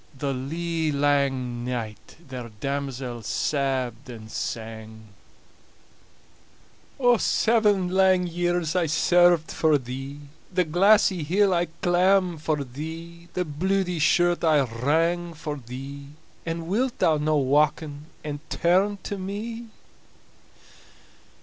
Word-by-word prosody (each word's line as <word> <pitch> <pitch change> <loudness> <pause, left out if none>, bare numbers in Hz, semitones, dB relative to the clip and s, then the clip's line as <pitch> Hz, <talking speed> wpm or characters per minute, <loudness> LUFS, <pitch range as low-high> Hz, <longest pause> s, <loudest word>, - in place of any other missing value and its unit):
The 140 0 -2
lee 160 +4 -2
lang 140 -4 0
night 110 -4 -5
ther 125 -3 -7
damosel 135 -3 -3
sabbed 130 +1 -2
and 110 -2 -9
sang: 110 -1 -6 2.1
"Seven 210 -5 +2
lang 185 0 +3
years 175 -1 -1
I 175 -3 +2
served 175 +1 +4
for 155 -2 +3
thee, 135 +3 -7 0.3
The 180 0 +2
glassy 190 +2 +4
hill 190 +6 +2
I 175 0 +2 0.2
clamb 180 -1 +3
for 150 -2 -1
thee, 165 +6 -8
The 180 - 0
bluidy 180 +3 -1
shirt 175 +3 +3
I 155 -3 +4
wrang 160 +8 0
for 150 -1 -5
thee; 135 +3 -8 0.4
And 165 0 -3
wilt 240 +7 0
thou 155 -2 +3
no 155 +1 +1
wauken 145 +2 +1 0.2
and 145 -1 -4
turn 190 +4 +2
to 200 - -4
me?" 225 +5 -5
155 Hz, 110 wpm, -25 LUFS, 135-175 Hz, 2.1 s, served